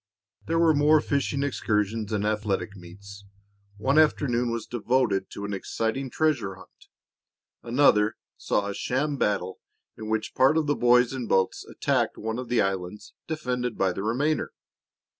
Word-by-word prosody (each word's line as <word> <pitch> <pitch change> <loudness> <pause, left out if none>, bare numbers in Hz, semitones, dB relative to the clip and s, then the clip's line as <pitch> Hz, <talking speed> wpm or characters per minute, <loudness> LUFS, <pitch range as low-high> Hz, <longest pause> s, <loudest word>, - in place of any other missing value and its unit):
There 165 - 0
were 165 -1 +5
more 150 +1 +5
fishing 140 -1 -1
excursions 110 -5 -1
and 105 -1 -1
athletic 105 -1 -1
meets. 100 +2 -12 0.5
One 135 +8 +2
afternoon 125 -6 +2
was 115 -2 -3
devoted 120 -3 0
to 100 - -7
an 100 - -4
exciting 115 +6 -2
treasure 145 -11 0
hunt; 95 -1 -18 0.7
another 115 -4 +3 0.2
saw 100 - -1
a 100 - -3
sham 140 +7 -1
battle 95 -5 -1 0.4
in 110 0 -7
which 110 0 -2
part 135 +4 +4
of 160 - +1
the 145 0 +1
boys 125 +1 +4
in 125 -3 -4
boats 95 -1 +1
attacked - - -1
one 110 +2 -3
of 125 - -6
the 120 -1 +3
islands 95 +1 -4
defended 125 -6 -3
by 95 -2 +1
the 95 - -5
remainder. 135 +9 -1
115 Hz, 155 wpm, -26 LUFS, 100-135 Hz, 0.7 s, were